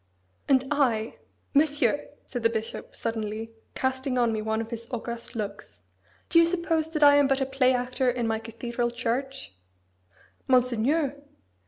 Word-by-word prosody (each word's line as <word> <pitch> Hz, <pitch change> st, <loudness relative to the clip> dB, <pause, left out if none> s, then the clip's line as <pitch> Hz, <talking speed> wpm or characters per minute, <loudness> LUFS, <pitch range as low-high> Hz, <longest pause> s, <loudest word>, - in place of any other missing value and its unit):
"And 265 Hz, -2 st, +5 dB
I 240 Hz, -6 st, +1 dB, 0.4 s
Monsieur!" 290 Hz, -3 st, +3 dB, 0.2 s
said 245 Hz, -, -5 dB
the 230 Hz, -, +3 dB
bishop, 225 Hz, -1 st, -5 dB
suddenly, 225 Hz, 0 st, -3 dB, 0.2 s
casting 260 Hz, 0 st, -1 dB
on 235 Hz, -2 st, +2 dB
me 215 Hz, -, -2 dB
one 220 Hz, 0 st, -1 dB
of 225 Hz, +1 st, -5 dB
his 230 Hz, 0 st, -6 dB
august 235 Hz, -1 st, -5 dB
looks, 205 Hz, -2 st, -6 dB, 0.5 s
"Do 335 Hz, -, +5 dB
you 335 Hz, -, +7 dB
suppose 335 Hz, -2 st, 0 dB
that 305 Hz, -2 st, +2 dB
I 285 Hz, 0 st, +8 dB
am 285 Hz, -1 st, +5 dB
but 270 Hz, 0 st, +2 dB
a 270 Hz, -, +1 dB
play 265 Hz, -1 st, +2 dB
actor 250 Hz, +1 st, 0 dB
in 245 Hz, -1 st, -1 dB
my 220 Hz, 0 st, 0 dB
cathedral 235 Hz, +2 st, -3 dB
church?" 250 Hz, -, -3 dB, 0.9 s
"Monseigneur!" 260 Hz, +4 st, +2 dB
250 Hz, 155 wpm, -27 LUFS, 230-275 Hz, 0.9 s, I